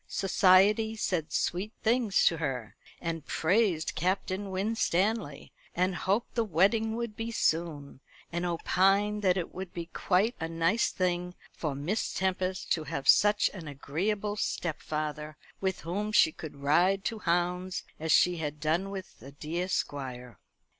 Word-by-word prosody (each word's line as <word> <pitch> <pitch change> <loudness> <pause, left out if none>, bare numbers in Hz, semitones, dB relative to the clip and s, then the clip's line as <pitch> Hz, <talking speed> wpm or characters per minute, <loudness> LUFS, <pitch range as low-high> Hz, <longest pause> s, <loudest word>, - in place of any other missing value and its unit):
Society 200 +3 +4
said 170 -7 -2
sweet 190 +8 -1
things 230 -3 +3
to 165 - +4
her; 130 -8 -4 0.2
and 165 -2 -4
praised 180 -2 +1
Captain 190 +3 -1
Winstanley; 195 -3 -1 0.2
and 185 +2 +1
hoped 200 +6 -1
the 230 - +1
wedding 220 +4 +2
would 235 -2 -4
be 225 +1 -4
soon; 160 -10 -1 0.3
and 175 +1 -2
opined 195 +4 +2
that 185 -2 +3
it 175 - -4
would 185 -1 -6
be 170 -1 -4
quite 200 +6 +2
a 160 - -2
nice 165 +7 +1
thing 180 -1 -1 0.2
for 150 -4 -4
Miss 170 +11 -2
Tempest 185 0 -1
to 160 -2 +1
have 140 -2 -4
such 205 0 +5
an 175 -6 -8
agreeable 195 +9 -2
stepfather, 155 -4 -3 0.2
with 190 -1 -2
whom 205 +6 -3
she 180 -5 +5
could 155 -1 -9
ride 180 +7 +3
to 225 -2 -2
hounds 180 +1 -1 0.2
as 160 0 -1
she 180 +2 +5
had 150 -2 -4
done 160 +6 0
with 195 -2 -8
the 135 +4 -11
dear 160 +5 -3
Squire. 125 - -4
180 Hz, 145 wpm, -29 LUFS, 160-200 Hz, 0.3 s, such